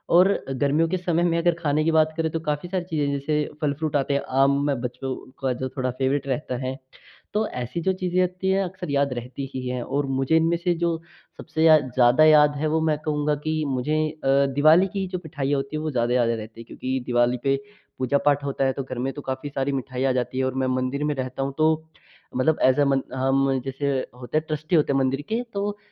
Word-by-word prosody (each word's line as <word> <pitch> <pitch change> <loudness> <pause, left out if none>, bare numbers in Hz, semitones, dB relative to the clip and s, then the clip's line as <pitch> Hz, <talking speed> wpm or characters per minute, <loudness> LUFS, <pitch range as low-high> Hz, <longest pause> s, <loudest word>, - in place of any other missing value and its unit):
और 180 +2 +7 0.2
गर्मियों 145 +4 +1
के 185 - 0
समय 175 -1 0
में 170 -1 +2
अगर 170 +1 +3
खाने 155 -2 +1
की 165 - +2
बात 155 0 +3
करें, 160 -1 0
तो 165 - -2
काफ़ी 150 +1 -3
सारी 185 -1 -1
चीज़ें 155 -4 -1
हैं, 140 - 0
जैसे 150 +1 -1
फल 145 -2 +1
फ्रूट 155 +1 -3
आते 140 0 +1
हैं, 140 - +1
आम 135 +1 +3
में 140 -3 0
बच्चों 130 +2 -4 0.3
का 130 -1 +1
जो 130 - -2
थोड़ा 130 -1 0
फ़ेवरेट 135 +2 -1
रहता 130 -1 -2
है। 130 +1 -3 0.6
तो 215 +1 +1
ऐसी 125 +7 -4
जो 190 +3 +1
चीज़ें 185 -1 -1
होती 185 +1 -1
हैं, 195 +1 +2
अक्सर 185 -2 -6
याद 140 -1 +1
रहती 125 +3 -6
ही 130 -1 -4
हैं 125 0 -2
और 145 +3 -1
मुझे 135 +4 +2
इनमें 165 +1 +2
से 175 +1 0
जो 170 0 0 0.4
सबसे 160 +1 -2
या 160 -1 +8
ज़्यादा 130 +1 +3
याद 150 -1 +6
है, 155 +2 0
वो 160 +1 +1
मैं 155 -1 +1
कहूँगा 150 -1 0
कि 155 0 0
मुझे 135 +3 -1
अ, 140 -2 +2
दिवाली 155 +6 +6
की 195 -1 -1
जो 185 0 -3
मिठाइयाँ 145 -2 -1
होती 135 +2 -4
हैं, 155 - -3
वो 155 - -2
ज़्यादा 120 -2 0
याद 120 -2 +3
रहती 115 0 -5
हैं, - - -11
क्योंकि 130 +1 -3
दिवाली 120 0 +2
पे 135 -1 +3 0.4
पूजा-पाठ 140 +2 +2
होता 135 -1 -1
है, 130 - +1
तो 135 - -4
घर 130 -1 -7
में 135 +2 -2
तो 145 - -7
काफ़ी 130 +1 -4
सारी 140 0 -1
मिठाइयाँ 130 0 -1
आ 130 - +2
जाती 125 0 -2
हैं। 130 - +1
और 130 - -1
मैं - - +1
मंदिर 135 +3 -2
में 150 0 +1
रहता 130 0 -3
हूँ, 135 0 -3
तो 160 0 +2 0.5
मतलब 150 +5 +2
ऐज़ 130 +2 +4
अ - - +6
मन 135 -1 +2
हम 135 +1 +2
जैसे 135 +1 -2 0.3
होते 125 +4 -2
हैं, 155 - +1
ट्रस्टी 155 +2 -1
होते 150 -3 +3
हैं - - +2
मंदिर 135 +1 0
के, 225 +2 0
तो 200 - -2
वो 205 0 -3
145 Hz, 245 wpm, -24 LUFS, 130-160 Hz, 0.6 s, या